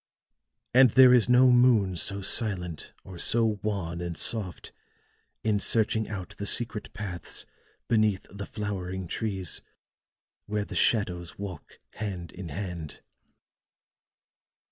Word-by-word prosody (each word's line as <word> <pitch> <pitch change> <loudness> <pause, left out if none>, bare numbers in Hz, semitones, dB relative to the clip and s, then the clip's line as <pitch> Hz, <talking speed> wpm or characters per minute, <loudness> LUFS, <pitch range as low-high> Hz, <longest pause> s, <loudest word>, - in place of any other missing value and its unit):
And 130 0 +7
there 130 +2 +7
is 125 -1 +4
no 125 +1 +6
moon 120 -7 +4
so 100 +3 0
silent, 90 -8 0
or 90 -3 -11
so 110 -1 +2
wan 90 -5 -3
and 85 -1 -5
soft 100 -7 +1 0.7
in 105 -2 +1
searching 110 +1 +2
out 100 -4 -6
the 100 - -3
secret 115 -2 -1
paths 100 -5 -5 0.4
beneath 110 -4 +1
the 100 +1 -7
flowering 95 -3 -5
trees, 95 -3 -2 0.9
where 105 0 -2
the - - -8
shadows 90 -6 0
walk 95 -7 -8
hand 95 -6 -6
in 90 -2 -8
hand." 85 -2 -6
100 Hz, 120 wpm, -27 LUFS, 90-110 Hz, 0.9 s, And